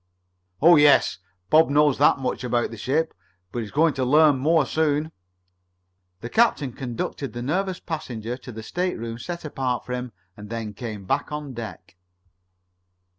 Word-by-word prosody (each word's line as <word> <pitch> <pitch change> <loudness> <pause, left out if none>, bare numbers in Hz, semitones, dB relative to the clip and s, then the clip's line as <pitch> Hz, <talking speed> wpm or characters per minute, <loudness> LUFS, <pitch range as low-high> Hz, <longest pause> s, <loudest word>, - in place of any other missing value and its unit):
"Oh, 170 0 +8
yes, 145 -10 +5 0.3
Bob 160 -1 +6
knows 145 -1 +3
that 145 - +5
much 130 -1 -3
about 120 -1 0
the - - -7
ship. 155 +9 0 0.4
But 120 - -3
he's 110 -3 -5
going 155 +4 +2
to 130 - -2
learn 145 +1 +5
more 155 +2 +3
soon." 155 0 0 1.1
The 115 - -5
captain 155 - +2
conducted 125 +2 -4
the 120 0 -5
nervous 185 +6 -1
passenger 120 -8 -5
to 125 0 -10
the 110 -1 -8
stateroom 115 -8 -3
set 170 +4 -6
apart 130 -4 -2
for 125 - -5
him 125 -1 -4 0.2
and 105 0 -11
then 115 -2 -5
came 105 -2 -7
back - - -1
on 150 -2 -5
deck. 105 -6 -9
135 Hz, 160 wpm, -24 LUFS, 115-155 Hz, 1.1 s, Oh